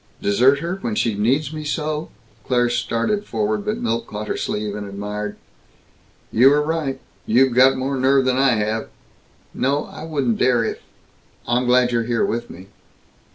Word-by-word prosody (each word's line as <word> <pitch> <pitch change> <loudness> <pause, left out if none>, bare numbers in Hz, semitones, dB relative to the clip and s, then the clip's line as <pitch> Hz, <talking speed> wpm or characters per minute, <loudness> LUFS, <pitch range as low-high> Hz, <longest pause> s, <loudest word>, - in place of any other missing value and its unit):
"Desert 130 +8 +3
her? 175 +3 -3
When 215 +3 -3
she 115 - +1
needs 135 +9 0
me 155 0 -5
so?" 150 +1 -3 0.4
Claire 120 -1 +2
started 120 - -1
forward, 110 - -2
but - - -2
Milt 115 0 -2
caught 105 0 -6
her - - -1
sleeve, 105 -1 -3
and 105 -1 -5
admired, 105 +1 -5 1.0
"You 125 +4 +6
were 145 +1 +3
right! 150 -4 -2 0.3
You've 125 +3 +4
got 130 +2 +5
more 135 +2 -2
nerve 135 +1 +3
than 130 0 +1
I 135 -1 +4
have!" 110 +1 -2 0.6
"No. 140 +3 0
I - - -10
wouldn't 140 -8 -1
dare 120 -3 +3
if - - -4 0.7
I'm 125 +1 +1
glad 125 0 +4
you're 115 -1 0
here 120 -1 +1
with 120 +1 -3
me!" 95 +3 -12
125 Hz, 170 wpm, -21 LUFS, 110-140 Hz, 1.0 s, You